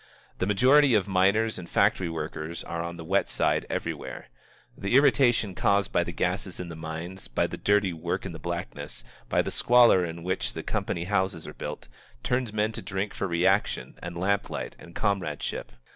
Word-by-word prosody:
The 95 - 0
majority 130 +5 +5
of 100 -2 +2
miners 100 +3 +2
and 85 - -9
factory 90 -3 +2
workers 80 +1 -5
are 85 0 -4
on 85 0 -5
the 80 - -8
wet 95 +4 +1
side - - +1
everywhere. 65 - -4 0.5
The 100 +5 -1
irritation 120 -7 +4
caused 100 +2 +2
by 85 - +2
the 85 - -5
gases 90 +2 -2
in 90 -1 -5
the 85 - -7
mines, 80 +4 -6
by - - 0
the - - -4
dirty 100 -3 +2
work 80 - -3
in - - -4
the - - -8
blackness, - - -5 0.3
by - - +3
the - - -4
squalor 120 -6 +5
in 85 0 -5
which 95 +1 -1
the - - -5
company 85 - -2
houses 95 -3 -1
are - - -8
built, - - -6 0.4
turns 125 -2 0
men 110 +1 0
to - - -6
drink 100 +1 -3
for 100 - -2
reaction 95 +4 +1
and 85 0 -6
lamplight 100 +3 -1
and 85 - -13
comradeship. 95 - -2
95 Hz, 185 wpm, -27 LUFS, 85-105 Hz, 0.5 s, majority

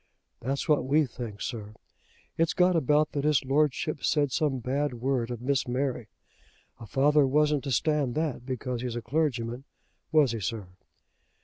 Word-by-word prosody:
"That's 135 +3 -3
what 150 -2 +3
we 150 +4 +3
think, 115 -5 -7
sir. 110 -3 -6 0.6
It's 165 0 +1
got 180 -1 +4
about 150 0 +2
that 140 - -2
his 150 -2 +2
Lordship 150 +1 0
said 145 -3 +2
some 145 -2 0
bad 130 +2 -1
word 125 -1 -1
of 120 -1 -6
Miss 135 -1 0
Mary. 125 -2 -2 0.7
A 115 - -10
father 145 +2 +3
wasn't 150 +1 +2
to 135 - -2
stand 145 -2 +1
that 155 -6 -2
because 125 -1 -4
he's 125 -2 -3
a 120 - -4
clergyman, 125 -4 -1 0.5
was 150 -6 +4
he, 115 - -3
sir?" 105 -2 -4
135 Hz, 165 wpm, -28 LUFS, 120-150 Hz, 0.7 s, got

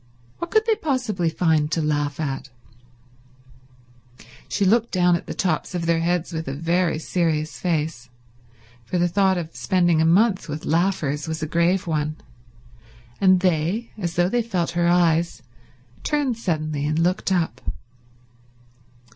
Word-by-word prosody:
What 340 - -4
could 435 +3 +3
they 450 - +3
possibly 245 - -1
find 160 -2 +1
to 165 - 0
laugh 145 -1 -1
at? 135 -3 -3 2.0
She 200 - 0
looked 225 +4 +3
down 180 -2 +3
on 170 - -2
the - - -5
tops 180 0 -1
of 170 -1 -2
their 165 0 +2
heads 175 0 -1
with 160 -2 -4
a 135 - -3
very 170 +2 +1
serious 160 -2 -1
face, 155 -7 -2 0.7
for 150 +10 -3
the 175 0 +3
thought 190 +1 +2
of 165 -2 -5
spending 175 -4 +2
a - - +3
month 190 +2 +3
with 150 +1 -5
laughers 160 -4 0
was 160 0 -3
a - - -1
grave 170 +4 +1
one, 155 -2 -1 1.0
and 185 -2 +5
they, 185 +6 0
as 175 -5 -4
though 175 0 +3
they 240 +5 +1
felt 185 -8 -2
her 170 0 +1
eyes, 170 -4 +2 0.6
turned 290 -5 0
suddenly 155 -8 -2
and 155 +1 0
looked 180 +4 +1
up. 165 -9 0
170 Hz, 150 wpm, -23 LUFS, 155-185 Hz, 2.0 s, and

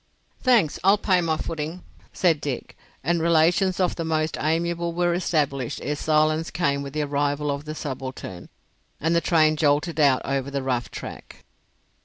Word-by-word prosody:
"Thanks. 235 - +3
I'll 195 +2 +5
pay 185 -3 +2
my 160 -2 0
footing," 160 +3 -5 0.3
said 165 -5 +2
Dick, 135 -4 -4 0.3
and 170 +3 +1
relations 170 +3 +3
of 180 -2 +1
the 165 - -2
most 160 -1 0
amiable 170 +2 0
were 175 0 +1
established 145 -7 -1
ere 150 - -1
silence 155 +1 +1
came 140 -5 0
with 140 -1 -7
the 155 0 0
arrival 145 0 0
of 140 +1 -4
the 155 0 -5
subaltern, 130 - -6 0.5
and 165 +3 +1
the 170 - +3
train 155 -3 +3
jolted 150 +2 +1
out 140 -3 +4
over 135 0 -1
the 140 -1 -3
rough 125 -2 -1
track. - - -9
155 Hz, 165 wpm, -24 LUFS, 140-170 Hz, 0.5 s, I'll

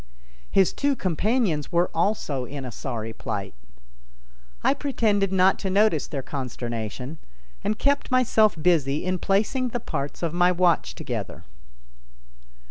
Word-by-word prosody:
His 190 -2 +3
two 285 -1 +1
companions 190 - 0
were 175 +1 +2
also 160 -8 0
in 135 +1 -6
a 125 - -6
sorry 115 -2 -5
plight. 100 -3 -4 1.1
I - - +4
pretended 220 -9 +1
not 190 0 +4
to 195 - -2
notice 195 -5 +3
their 140 -4 -4
consternation, 125 +1 -5 0.4
and 215 +1 0
kept 280 +3 +1
myself 235 -4 +4
busy 150 -4 +2
in 185 0 0
placing 215 +8 +1
the 245 0 -3
parts 145 -7 -4
of 165 -1 -1
my 175 +1 +4
watch 170 - +2
together. - - -5
180 Hz, 130 wpm, -25 LUFS, 140-215 Hz, 1.1 s, I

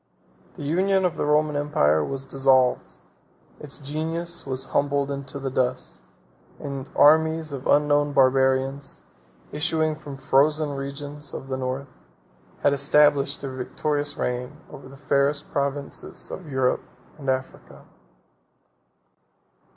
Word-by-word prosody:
The - - -7
union 190 +5 +2
of 180 - 0
the - - -2
Roman 150 0 +2
empire 80 - +2
was 135 - -4
dissolved; 130 -2 +2 0.7
its 145 -2 -8
genius 160 +3 -3
was 130 0 -2
humbled 140 0 +1
in 140 0 -4
the 135 0 -4
dust; 65 - -2 0.6
and 140 -1 -6
armies 160 0 +4
of 135 -1 -5
unknown 145 0 +3
Barbarians, 135 +1 +2 0.5
issuing 155 0 0
from 150 -2 -9
the 135 - -16
frozen 150 +2 +3
regions 140 +1 -6
of 135 - -7
the 130 - -2
North, 130 +1 -4 0.7
had 145 - +3
established 140 0 +3
their 135 -2 -5
victorious 145 +3 -2
reign 125 0 -3
over 130 - -11
the 135 - -13
fairest 140 +1 0
provinces 140 0 -3
of 175 -5 -8
Europe 130 -2 +1 0.4
and 135 -2 -4
Africa. 130 0 -4
140 Hz, 125 wpm, -24 LUFS, 135-150 Hz, 0.7 s, armies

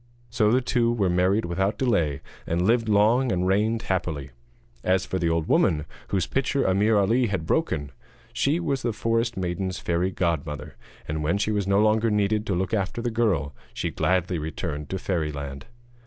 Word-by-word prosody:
So 110 -3 +2
the 125 +2 +3
two 120 -2 +1
were 100 -6 +1
married 95 +5 +2
without 95 +4 -1
delay, 85 - +1 0.3
and 85 +2 0
lived 115 +1 +2
long 110 +5 +3
and 90 -1 0
reigned 110 +4 +1
happily. 80 -7 -2 0.5
As 95 0 +2
for 95 - -2
the 85 -1 +1
old 80 -1 0
woman 75 -1 +2 0.2
whose 95 -4 0
pitcher 135 +4 0
Ameer 105 +3 +3
Ali 115 +5 +3
had 95 -6 -2
broken, 70 -2 -1 0.4
she 150 +5 +1
was 140 -6 -1
the 120 -3 -1
forest 115 +1 0
maiden's 95 +1 -2
fairy 85 +2 0
godmother, 80 -6 -2 0.3
and 75 +1 -2
when 85 +6 +1
she 105 +1 0
was 100 -2 -1
no 100 0 +3
longer 110 +1 +3
needed 105 +1 +1
to 95 - 0
look 95 +3 -2
after 100 +1 -1
the 120 0 -2
girl 95 -11 0 0.2
she - - -2
gladly 90 -2 0
returned 75 -1 -4
to 95 - -2
fairyland. 75 -7 -3
95 Hz, 180 wpm, -25 LUFS, 85-110 Hz, 0.5 s, the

